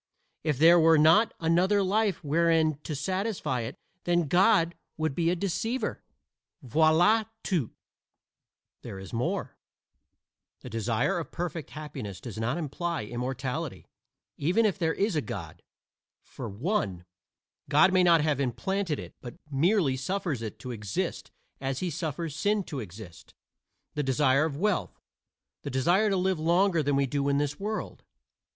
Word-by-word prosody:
If 150 Hz, -4 st, 0 dB
there 170 Hz, +4 st, +7 dB
were 165 Hz, 0 st, +6 dB
not 160 Hz, +9 st, +5 dB
another 180 Hz, +5 st, +3 dB
life 205 Hz, 0 st, +1 dB
wherein 160 Hz, 0 st, +2 dB
to 150 Hz, -, -3 dB
satisfy 185 Hz, -, -2 dB
it 115 Hz, +3 st, -6 dB, 0.3 s
then 175 Hz, -2 st, +2 dB
God 175 Hz, 0 st, +4 dB, 0.2 s
would 155 Hz, -2 st, -1 dB
be 165 Hz, +3 st, +1 dB
a 175 Hz, -, +2 dB
deceiver. 200 Hz, +7 st, -2 dB, 0.6 s
Voila 160 Hz, -, +4 dB, 0.2 s
tout." 165 Hz, -, 0 dB, 1.1 s
There -, -, -8 dB
is 95 Hz, -2 st, -10 dB
more: 120 Hz, +2 st, -2 dB, 1.0 s
the 125 Hz, -, -9 dB
desire 115 Hz, -, 0 dB
of 165 Hz, -, -6 dB
perfect 170 Hz, -3 st, -4 dB
happiness 145 Hz, -11 st, -7 dB
does 115 Hz, -5 st, -7 dB
not 120 Hz, +7 st, -1 dB
imply 170 Hz, -1 st, -3 dB
immortality, 130 Hz, +6 st, -4 dB, 0.5 s
even 180 Hz, +10 st, +2 dB
if 205 Hz, -2 st, 0 dB
there 160 Hz, -2 st, +1 dB
is 200 Hz, -2 st, 0 dB
a 150 Hz, -, +2 dB
God, 110 Hz, -, -7 dB, 0.6 s
for -, -, -8 dB
(1) 105 Hz, -, -2 dB, 0.6 s
God 170 Hz, +6 st, +5 dB
may 185 Hz, -, +5 dB
not 170 Hz, -3 st, +5 dB
have 150 Hz, -2 st, +1 dB
implanted 150 Hz, -, -1 dB
it, -, -, -9 dB
but 120 Hz, -2 st, -8 dB, 0.2 s
merely 155 Hz, 0 st, +2 dB
suffers 160 Hz, -, -2 dB
it 110 Hz, -3 st, -6 dB
to 125 Hz, -, -6 dB
exist, 105 Hz, -4 st, -3 dB, 0.3 s
as 135 Hz, -1 st, -2 dB
he 180 Hz, +2 st, -2 dB
suffers 160 Hz, -1 st, -4 dB
sin 205 Hz, +5 st, +1 dB
to 145 Hz, -6 st, -6 dB
exist, 100 Hz, -4 st, -11 dB, 0.6 s
the 150 Hz, -, -1 dB
desire 135 Hz, +1 st, +3 dB
of 145 Hz, -3 st, -3 dB
wealth, 200 Hz, +1 st, -1 dB, 0.6 s
the -, -, -5 dB
desire 175 Hz, +12 st, +2 dB
to 195 Hz, -, +1 dB
live 185 Hz, -2 st, 0 dB
longer 170 Hz, +2 st, +3 dB
than 145 Hz, -1 st, +1 dB
we 140 Hz, 0 st, +2 dB
do 140 Hz, +1 st, -1 dB
in 140 Hz, -, +2 dB
this 145 Hz, 0 st, -1 dB
world. 215 Hz, +2 st, -4 dB
160 Hz, 150 wpm, -28 LUFS, 135-180 Hz, 1.1 s, there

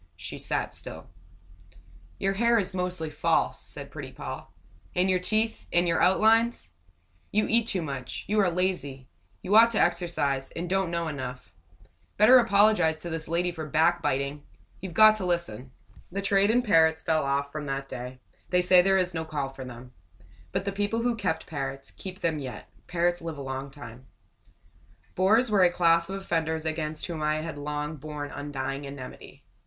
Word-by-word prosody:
She -, -, -7 dB
sat -, -, -2 dB
still. -, -, -9 dB, 1.1 s
"Your 195 Hz, 0 st, 0 dB
hair 235 Hz, +3 st, +3 dB
is 195 Hz, -3 st, 0 dB
mostly 180 Hz, -4 st, -3 dB
false," 145 Hz, -, 0 dB
said -, -, -10 dB
pretty -, -, -7 dB
Poll. -, -, -7 dB, 0.5 s
"And 185 Hz, +1 st, +2 dB
your 185 Hz, -, +2 dB
teeth 220 Hz, +4 st, 0 dB
and 175 Hz, +1 st, +3 dB
your 170 Hz, -, +1 dB
outlines. 220 Hz, -, +3 dB, 0.6 s
You 215 Hz, +1 st, +2 dB
eat 230 Hz, 0 st, +2 dB
too 185 Hz, -6 st, 0 dB
much. 135 Hz, -4 st, -6 dB
You 210 Hz, +1 st, +1 dB
are 195 Hz, -3 st, +4 dB
lazy. 170 Hz, -7 st, -2 dB, 0.4 s
You 200 Hz, -, +1 dB
ought 230 Hz, +1 st, +8 dB
to 215 Hz, -, +1 dB
exercise, 170 Hz, -6 st, 0 dB
and 170 Hz, +2 st, -3 dB
don't 190 Hz, 0 st, 0 dB
know 170 Hz, -1 st, -2 dB
enough. 130 Hz, -4 st, -6 dB, 0.6 s
Better 245 Hz, +5 st, +8 dB
apologize 205 Hz, -7 st, +4 dB
to 170 Hz, -, -6 dB
this 160 Hz, 0 st, -4 dB
lady 175 Hz, +2 st, 0 dB
for 160 Hz, -3 st, -6 dB
backbiting! 150 Hz, -3 st, +1 dB, 0.4 s
You've 185 Hz, -3 st, -7 dB
got 215 Hz, 0 st, +7 dB
to 205 Hz, -, -5 dB
listen." 135 Hz, -9 st, -2 dB, 0.4 s
The 200 Hz, +2 st, -3 dB
trade 195 Hz, +1 st, +3 dB
in 245 Hz, +2 st, +3 dB
parrots 160 Hz, -6 st, +4 dB
fell 160 Hz, -2 st, +1 dB
off 140 Hz, +1 st, -1 dB
from 150 Hz, -1 st, -5 dB
that 135 Hz, 0 st, -3 dB
day; 125 Hz, 0 st, -7 dB, 0.3 s
they 180 Hz, 0 st, +3 dB
say 180 Hz, 0 st, +7 dB
there 195 Hz, +1 st, +3 dB
is 180 Hz, -2 st, 0 dB
no 160 Hz, -1 st, -2 dB
call 150 Hz, -4 st, -3 dB
for 135 Hz, 0 st, -9 dB
them. 125 Hz, 0 st, -10 dB, 0.6 s
But 190 Hz, 0 st, -2 dB
the 200 Hz, -, -1 dB
people 205 Hz, +3 st, -1 dB
who 240 Hz, -1 st, +1 dB
kept 185 Hz, -7 st, -2 dB
parrots, 135 Hz, -2 st, -5 dB
keep 190 Hz, +1 st, -9 dB
them 160 Hz, -2 st, 0 dB
yet 130 Hz, -3 st, -7 dB, 0.2 s
parrots 175 Hz, 0 st, 0 dB
live 165 Hz, -2 st, -5 dB
a -, -, -6 dB
long 135 Hz, +1 st, -5 dB
time. 130 Hz, -3 st, -12 dB, 1.1 s
Bores 215 Hz, +6 st, +3 dB
were 205 Hz, -2 st, +4 dB
a 180 Hz, -, +6 dB
class 170 Hz, -1 st, +3 dB
of 195 Hz, 0 st, -4 dB
offenders 160 Hz, -4 st, -2 dB
against 155 Hz, -1 st, -2 dB
whom 165 Hz, -3 st, -5 dB
I 155 Hz, 0 st, 0 dB
had 160 Hz, -3 st, -6 dB
long 150 Hz, +1 st, -4 dB
borne 150 Hz, 0 st, -6 dB
undying 140 Hz, -1 st, -4 dB
enmity. 140 Hz, -2 st, -10 dB
165 Hz, 180 wpm, -27 LUFS, 145-190 Hz, 1.1 s, ought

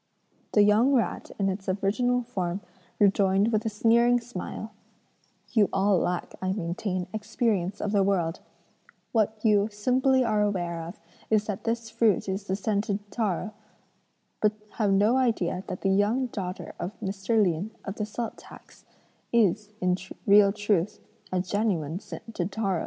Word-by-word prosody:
"The 210 Hz, -, +6 dB
young 215 Hz, +7 st, +4 dB
rat 240 Hz, -4 st, 0 dB
in 195 Hz, -, +1 dB
its 190 Hz, 0 st, -3 dB
original 245 Hz, +6 st, +1 dB
form 190 Hz, -5 st, -3 dB, 0.4 s
rejoined 200 Hz, +1 st, +3 dB
with 220 Hz, 0 st, 0 dB
a -, -, +1 dB
sneering 235 Hz, +3 st, +4 dB
smile: 225 Hz, -1 st, -6 dB, 0.8 s
'You 215 Hz, -4 st, +4 dB
all 195 Hz, -1 st, +3 dB
lack, 180 Hz, +1 st, -2 dB
I 185 Hz, 0 st, 0 dB
maintain, 180 Hz, 0 st, -2 dB
experience 210 Hz, -3 st, -1 dB
of 210 Hz, -, -2 dB
the 205 Hz, -2 st, +3 dB
world; 180 Hz, -4 st, +1 dB, 0.7 s
what 220 Hz, -1 st, +1 dB
you 210 Hz, -1 st, +4 dB
simply 255 Hz, +5 st, +2 dB
are 215 Hz, -2 st, +2 dB
aware 175 Hz, -5 st, -1 dB
of 170 Hz, +4 st, -8 dB, 0.3 s
is 215 Hz, -1 st, +3 dB
that 205 Hz, -3 st, -5 dB
this 230 Hz, 0 st, -2 dB
fruit 225 Hz, -5 st, +2 dB
is 195 Hz, +1 st, -3 dB
the 190 Hz, -, -1 dB
scented 205 Hz, 0 st, -2 dB
taro, 215 Hz, -1 st, -1 dB, 0.9 s
but 215 Hz, 0 st, +3 dB, 0.2 s
have 210 Hz, -3 st, 0 dB
no 205 Hz, +6 st, +4 dB
idea 220 Hz, -8 st, 0 dB
that 185 Hz, -2 st, -5 dB
the 195 Hz, -, +2 dB
young 210 Hz, +7 st, +2 dB
daughter 190 Hz, -6 st, -5 dB
of 190 Hz, +4 st, -5 dB
Mr. 200 Hz, +2 st, 0 dB
Lin, 185 Hz, 0 st, +1 dB, 0.2 s
of 195 Hz, +1 st, -5 dB
the 210 Hz, -, -1 dB
salt 225 Hz, +2 st, -4 dB
tax, -, -, -15 dB, 0.5 s
is, 210 Hz, -2 st, +2 dB
in 180 Hz, 0 st, +2 dB, 0.3 s
real 200 Hz, 0 st, +7 dB
truth, 205 Hz, -2 st, 0 dB, 0.3 s
a 185 Hz, -, +1 dB
genuine 180 Hz, -5 st, -1 dB
scented 210 Hz, -4 st, -6 dB
taro.'" 195 Hz, -4 st, 0 dB
205 Hz, 150 wpm, -27 LUFS, 190-220 Hz, 0.9 s, real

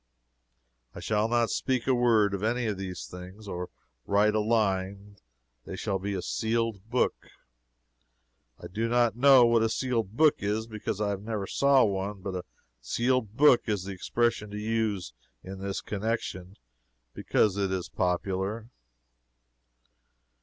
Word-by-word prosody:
I -, -, -7 dB
shall 105 Hz, 0 st, 0 dB
not 120 Hz, -1 st, +1 dB
speak 130 Hz, -3 st, -1 dB
a 130 Hz, -, +3 dB
word 115 Hz, -5 st, +3 dB
of 100 Hz, -, -3 dB
any 120 Hz, +3 st, 0 dB
of 105 Hz, -2 st, -1 dB
these 95 Hz, -2 st, -6 dB
things, 90 Hz, +4 st, -11 dB
or 90 Hz, -2 st, -5 dB, 0.4 s
write 105 Hz, +1 st, +3 dB
a 110 Hz, -, +2 dB
line. 100 Hz, -2 st, -1 dB, 0.5 s
They -, -, -7 dB
shall 95 Hz, 0 st, -2 dB
be 100 Hz, +2 st, -3 dB
as 95 Hz, -, -4 dB
a -, -, -6 dB
sealed 115 Hz, -2 st, -1 dB
book. 125 Hz, +1 st, 0 dB, 1.3 s
I -, -, -10 dB
do 115 Hz, +5 st, -2 dB
not 120 Hz, -2 st, +2 dB
know 130 Hz, 0 st, +7 dB
what 115 Hz, -1 st, +3 dB
a 115 Hz, -, +2 dB
sealed 115 Hz, -4 st, -2 dB
book 155 Hz, -2 st, +5 dB
is, 105 Hz, +2 st, -1 dB
because 110 Hz, -2 st, -5 dB
I 105 Hz, -1 st, 0 dB
never 105 Hz, 0 st, -4 dB
saw 140 Hz, +4 st, +4 dB
one, 100 Hz, 0 st, -2 dB
but 95 Hz, 0 st, -5 dB
a 90 Hz, 0 st, -5 dB, 0.4 s
sealed 120 Hz, -, 0 dB
book 140 Hz, -5 st, +5 dB
is 105 Hz, -4 st, -1 dB
the 100 Hz, +1 st, -6 dB
expression 105 Hz, +3 st, -1 dB
to 105 Hz, -, -6 dB
use 105 Hz, -, -2 dB, 0.3 s
in 95 Hz, +1 st, -8 dB
this 100 Hz, 0 st, -3 dB
connection, 100 Hz, -3 st, -4 dB, 0.6 s
because 105 Hz, -3 st, +1 dB
it 100 Hz, -2 st, -1 dB
is 95 Hz, -2 st, -2 dB
popular. 95 Hz, +5 st, -2 dB
105 Hz, 155 wpm, -28 LUFS, 95-115 Hz, 1.3 s, know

